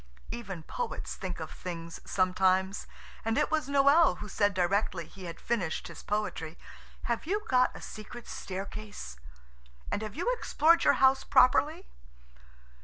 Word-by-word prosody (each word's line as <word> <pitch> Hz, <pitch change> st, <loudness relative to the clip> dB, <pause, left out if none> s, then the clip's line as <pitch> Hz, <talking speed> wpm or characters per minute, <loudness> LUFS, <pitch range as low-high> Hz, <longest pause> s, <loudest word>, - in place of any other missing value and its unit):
Even 195 Hz, -8 st, -6 dB
poets -, -, -4 dB
think 185 Hz, -3 st, -5 dB
of 160 Hz, -, -6 dB
things 165 Hz, -2 st, -6 dB
sometimes, 190 Hz, +1 st, +2 dB, 0.4 s
and 225 Hz, +1 st, 0 dB
it 300 Hz, -, +2 dB
was 310 Hz, -3 st, +1 dB
Noël 280 Hz, -, +5 dB
who 210 Hz, -, -7 dB
said 205 Hz, 0 st, +1 dB
directly 185 Hz, -1 st, +1 dB
he 185 Hz, +3 st, -11 dB
had 170 Hz, -1 st, -7 dB
finished 200 Hz, -9 st, -2 dB
his -, -, -9 dB
poetry, 190 Hz, -6 st, -3 dB, 0.5 s
"Have 235 Hz, +5 st, -2 dB
you 415 Hz, +3 st, -1 dB
got 255 Hz, 0 st, +4 dB
a -, -, -9 dB
secret 220 Hz, +2 st, -9 dB
staircase? 195 Hz, -, -6 dB, 0.7 s
And -, -, -1 dB
have 215 Hz, -1 st, -5 dB
you 415 Hz, -, +1 dB
explored 335 Hz, -7 st, +3 dB
your -, -, +7 dB
house 265 Hz, 0 st, +4 dB
properly?" 305 Hz, +7 st, +4 dB
210 Hz, 145 wpm, -30 LUFS, 185-270 Hz, 0.7 s, your